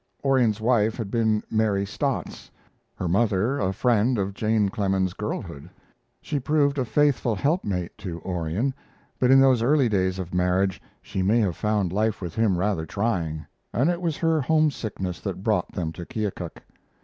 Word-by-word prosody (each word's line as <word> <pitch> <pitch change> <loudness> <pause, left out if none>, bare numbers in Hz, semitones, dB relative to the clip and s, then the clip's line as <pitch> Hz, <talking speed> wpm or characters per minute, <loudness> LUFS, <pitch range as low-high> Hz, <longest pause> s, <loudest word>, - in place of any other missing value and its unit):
Orion's 125 -6 +3
wife 110 -1 +2
had 110 -5 -4
been 110 -2 +1
Mary 105 -3 +1
Stotts; - - -3 0.5
her 90 - -3
mother 110 +6 +1
a 95 -2 +1
friend 120 +3 +2
of 100 0 -1
Jane 110 0 +1
Clemens's 95 -2 0
girlhood. 85 -7 -5 0.5
She 145 - -2
proved 145 +1 +1
a 130 - 0
faithful 135 -3 +2
helpmate 100 - -1
to 85 -4 -5
Orion; 90 +8 -1 0.5
but 125 - +3
in 135 0 +7
those 130 -3 +5
early 135 0 +3
days 95 -2 +1
of 90 -2 -6
marriage 90 +1 +1 0.2
she 95 - -3
may 100 +5 +3
have 95 -6 0
found 105 -4 0
life 110 +2 0
with 85 -4 -5
him 110 -5 +2
rather 90 -4 -1
trying, 85 -7 -2 0.3
and 135 +10 +2
it 175 0 -3
was 165 -4 -1
her 165 -2 +2
homesickness 125 - 0
that 95 -2 -5
brought 105 -5 0
them 80 -4 -2
to 85 - -8
Keokuk. 105 -7 -4
105 Hz, 165 wpm, -25 LUFS, 95-125 Hz, 0.5 s, in